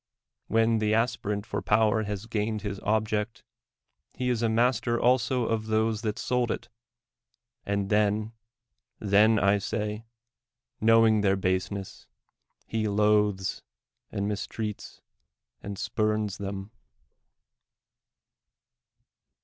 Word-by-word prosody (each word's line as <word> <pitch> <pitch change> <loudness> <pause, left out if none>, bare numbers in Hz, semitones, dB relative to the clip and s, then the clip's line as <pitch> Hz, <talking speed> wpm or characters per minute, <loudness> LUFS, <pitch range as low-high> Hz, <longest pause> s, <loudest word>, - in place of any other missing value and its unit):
"When 115 0 +2
the 110 0 +2
aspirant 105 -3 -1
for - - -3
power 110 +1 +3
has 105 0 -4
gained 110 -1 -2
his 100 -2 -4
object, 110 0 -1 0.7
he 125 -1 -1
is 120 -2 -1
master 120 +1 +1
also 125 0 +2
of 110 -1 -1
those 110 0 +1
that 105 -3 -2
sold 125 -1 0
it; - - -4 1.0
and 100 0 -1
then 105 +1 +2 0.4
— 125 +1 -56
then, 105 +2 +4
I 100 +1 +3
say, 105 +2 -3 0.7
knowing 110 -1 +5
their 95 -1 +3
baseness, 95 +1 -3 0.6
he 110 -1 -1
loathes 105 -2 +1 0.5
and 100 0 -2
mistrusts 105 +1 -5 0.6
and 100 0 -6
spurns 110 -1 -1
them. 100 +1 -5
105 Hz, 105 wpm, -27 LUFS, 100-115 Hz, 1.0 s, knowing